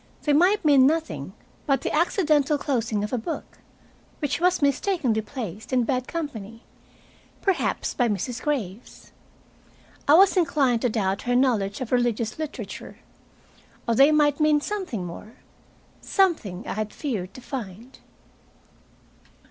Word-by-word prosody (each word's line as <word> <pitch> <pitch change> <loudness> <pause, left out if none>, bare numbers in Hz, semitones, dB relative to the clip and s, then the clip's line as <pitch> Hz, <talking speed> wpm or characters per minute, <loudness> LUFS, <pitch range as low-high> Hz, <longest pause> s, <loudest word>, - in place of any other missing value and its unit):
They 295 - +2
might 360 +6 +3
mean 275 -3 +6
nothing 190 - -2 0.3
but 275 -1 +2
the - - -3
accidental 305 -3 +2
closing 235 -7 -1
of 210 - -4
a 250 - +1
book, 320 +9 -6 0.6
which 290 +1 -2
was 360 +1 +3
mistakenly 280 - +1
placed 215 -3 -7
in 255 -1 +3
bad 255 +1 -1
company, 230 -9 -6 0.8
perhaps 390 -3 0
by 245 -2 +1
Mrs. 230 +5 -3
Graves. 235 -7 -4 1.0
I 290 - +7
was 390 +4 +6
inclined 280 -9 +2
to 250 - +2
doubt 195 -3 -1
her 245 - +3
knowledge 230 -5 +1
of 250 - -5
religious 240 -1 0
literature. 310 -2 -6 0.9
Or 230 - +2
they 275 +6 +6
might 295 -1 +3
mean 305 -1 +4
something 360 - -4
more, 190 +6 -9 0.7
something 280 - 0
I - - -2
had 215 0 -4
feared 205 - -4
to 255 - -10
find. 235 -1 -8
255 Hz, 135 wpm, -25 LUFS, 220-300 Hz, 1.0 s, I